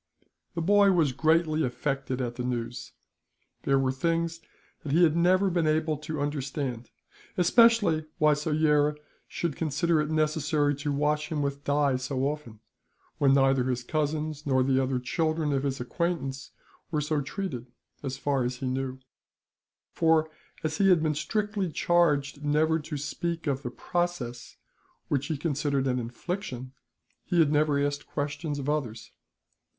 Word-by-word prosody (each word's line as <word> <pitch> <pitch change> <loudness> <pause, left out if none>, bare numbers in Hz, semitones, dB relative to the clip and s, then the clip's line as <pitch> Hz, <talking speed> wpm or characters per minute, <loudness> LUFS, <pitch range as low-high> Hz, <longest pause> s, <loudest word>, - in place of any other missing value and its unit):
The 170 - -1
boy 200 +1 +5
was 160 -6 +3
greatly 155 +3 +2
affected 130 +1 -2
at 120 -1 -2
the 125 - -4
news. 120 -1 -4 0.7
There 135 - +3
were 135 -1 +2
things 165 +4 -1 0.4
that 145 - -5
he 170 +3 +5
had 160 -2 +4
never 185 +3 +3
been 170 -2 +1
able 155 0 +1
to 150 +1 -5
understand; 140 -4 -3 0.5
especially 200 -4 +4
why 150 0 +4
Soyera 150 0 +2 0.3
should 170 -5 -3
consider 160 +1 +1
it 150 - -2
necessary 155 -1 +1
to 145 +1 -2
wash 150 +1 0
him 150 -2 0
with 140 0 -3
dye 145 -2 +2
so 130 +1 -3
often, 135 -6 -3 0.6
when 135 -1 +5
neither 135 -2 +3
his 125 -1 -1
cousins 155 +1 -2
nor 130 -3 +2
the 135 0 +2
other 130 0 0
children 155 +4 0
of 135 - +1
his 135 -1 -2
acquaintance 135 0 -3 0.4
were 155 - 0
so 150 0 0
treated 140 - -5 0.3
as 135 -2 -4
far 135 -1 0
as 125 +1 -2
he 130 - -6
knew, 130 0 -2 0.9
for 160 -1 +3 0.3
as 155 0 -2
he 195 -1 +5
had 175 -4 +5
been 155 -1 +1
strictly 205 +2 -2
charged 150 -4 +1
never 155 +2 +2
to 150 0 -5
speak 170 +4 -3
of 140 -3 -1
the 125 - -4
process, 140 -5 -3 0.5
which 140 -2 0
he 155 - -2
considered 145 -2 0
an 125 -1 +1
infliction, 130 - -5 0.5
he 180 - -1
had 160 -3 +5
never 150 -1 +3
asked 145 0 -1
questions 145 +1 -3
of 140 -1 -5
others. 125 -7 -2
150 Hz, 155 wpm, -28 LUFS, 135-160 Hz, 0.9 s, boy